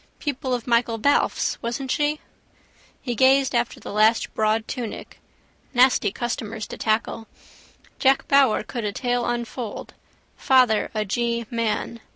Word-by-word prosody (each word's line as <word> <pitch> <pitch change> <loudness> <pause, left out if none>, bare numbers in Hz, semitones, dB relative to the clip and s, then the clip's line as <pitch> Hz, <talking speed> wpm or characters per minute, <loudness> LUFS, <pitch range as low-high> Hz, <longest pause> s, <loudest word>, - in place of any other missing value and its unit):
Pupil 270 -3 -2
of 240 - -6
Michael 235 -1 +1
Balfe's, 280 +6 +1
wasn't 250 +3 -3
she? 300 +1 0 0.8
He 245 - -2
gazed 265 +3 +4
after 235 -1 -1
the - - -8
last 215 +2 +3
broad 220 0 0
tunic. 240 -4 -6 0.6
Nasty 250 -5 +4
customers 225 -1 -4
to - - -7
tackle. 225 0 -1 0.7
Jack 270 0 +3
Power 275 -7 +4
could 235 +2 -5
a 210 - -1
tale 245 0 -1
unfold: 240 -1 -5 0.4
father 250 -5 +3
a 215 0 0
G 235 +2 -1
man. 230 0 -2
235 Hz, 135 wpm, -23 LUFS, 220-260 Hz, 0.8 s, gazed